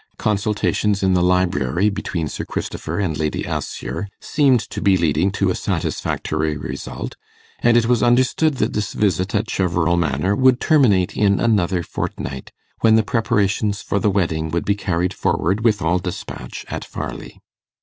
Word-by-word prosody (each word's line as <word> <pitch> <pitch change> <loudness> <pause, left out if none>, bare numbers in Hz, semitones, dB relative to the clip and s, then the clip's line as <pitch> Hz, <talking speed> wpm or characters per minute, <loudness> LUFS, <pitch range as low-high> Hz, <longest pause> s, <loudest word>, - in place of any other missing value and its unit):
Consultations 105 -1 0
in 95 -1 +3
the 90 - +3
library 90 0 +2
between 90 -5 -3
Sir - - -5
Christopher 85 - -4
and 90 -6 -1
Lady 75 -1 -1
Assher 90 +5 -4
seemed 140 -5 +3
to - - -4
be 100 -3 +4
leading 80 +2 +2
to - - +1
a - - -2
satisfactory 75 -1 -2
result; 65 -1 -6 0.4
and 120 0 +4
it 115 - +3
was 120 -2 +2
understood 130 +6 +3
that 130 - -1
this 105 -2 -2
visit 95 0 0
at 105 +2 +1
Cheverel 85 -4 +1
Manor 85 +5 0
would 130 +1 +4
terminate 110 - +3
in 100 -2 +2
another 95 -6 +1
fortnight, 65 -3 -5 0.3
when 110 -1 +5
the 110 - +4
preparations 105 -2 0
for 100 - -1
the 105 - +2
wedding 85 -5 0
would 85 +2 -2
be 100 - +2
carried 90 -2 -1
forward 95 +6 0
with 105 -5 +2
all 85 +2 +2
despatch 90 0 -6
at - - -5
Farleigh. - - -7
95 Hz, 160 wpm, -20 LUFS, 85-110 Hz, 0.4 s, when